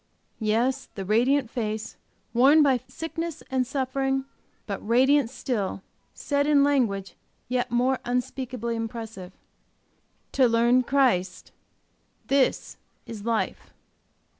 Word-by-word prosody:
Yes, 240 +5 0
the 195 - -5
radiant 245 +6 +2
face, 215 -2 -4 0.4
worn 275 +6 +6
by 265 -3 +3
sickness 325 +3 -5
and 255 -2 +1
suffering, 270 0 -1 0.4
but - - -4
radiant 260 +3 +3
still, 225 -6 -3 0.3
said 285 0 0
in 290 -2 +5
language 215 -10 +1 0.3
yet 250 0 -1
more 250 +2 +1
unspeakably 250 -1 -3
impressive, 225 -4 -6 1.0
"To 260 -2 +4
learn 235 +2 +4
Christ, 235 -10 +1 0.8
this 275 -1 +1 0.3
is 215 -2 -8
life!" 230 -2 -2
250 Hz, 105 wpm, -26 LUFS, 225-270 Hz, 1.0 s, worn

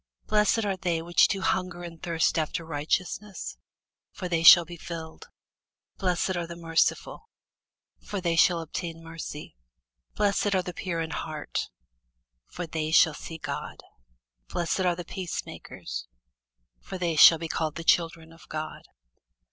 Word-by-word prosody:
Blessed 210 +1 +2
are 195 -1 0
they 175 -3 0
which 175 +1 +4
do 195 -2 -2
hunger 185 -2 -1
and 165 -2 -9
thirst 165 -1 +1
after 160 +1 -2
righteousness: 175 +6 -3 0.6
for 185 - -5
they 170 -2 0
shall 170 +1 +10
be 175 +1 -9
filled. 165 - -8 0.7
Blessed 185 0 0
are 170 -1 -2
the 170 - -7
merciful: 165 - 0 0.7
for 205 - -4
they 170 -2 0
shall 170 0 +4
obtain 165 +1 -6
mercy. 160 - -8 0.6
Blessed 205 -1 +1
are 185 - +2
the 180 - -6
pure 170 -2 -3
in 160 -1 -4
heart: 155 -2 -4 0.8
for 180 - -6
they 160 -1 -3
shall 160 0 +5
see 160 +2 -8
God. - - -6 0.7
Blessed 175 +1 -1
are 180 -2 +2
the 175 0 -7
peacemakers: 185 -1 -6 0.7
for 190 - -7
they 170 -3 -1
shall 165 +1 +9
be 165 +1 -5
called 155 -1 -2
the 165 - -5
children 165 -1 +1
of 165 - -18
God. 155 0 -6
170 Hz, 150 wpm, -27 LUFS, 165-185 Hz, 0.8 s, shall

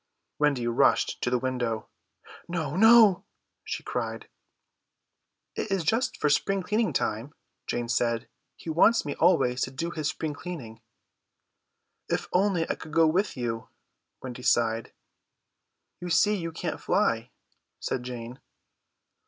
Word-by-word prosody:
Wendy 145 -5 +2
rushed 120 0 +2
to - - 0
the 125 - +2
window. 120 -3 -2 0.6
"No, 160 -4 -3
no," 220 -2 +7 0.4
she - - -5
cried. - - -4 1.3
"It - - -3
is 195 -3 0
just 225 +10 0
for - - +1
spring 190 +6 +1
cleaning 215 +4 +1
time," 115 +8 -2 0.3
Jane 120 0 -2
said, 115 -1 0 0.3
"he 165 - -6
wants 220 +7 +4
me 145 - -2
always 160 -8 +3
to - - 0
do 165 +6 -4
his 155 -3 -2
spring 155 -1 -3
cleaning." 135 -10 -8 1.3
"If - - -1
only 180 -3 +2
I - - 0
could 155 - -11
go 165 0 +5
with 180 +2 +1
you," 115 -2 -3 0.5
Wendy 125 -1 -7
sighed. 115 -2 +1 1.1
"You 175 - -6
see 190 +5 +4
you 165 -4 -4
can't 160 0 -4
fly," 120 - +1 0.5
said 125 - -2
Jane. 125 0 -7
150 Hz, 135 wpm, -27 LUFS, 120-180 Hz, 1.3 s, no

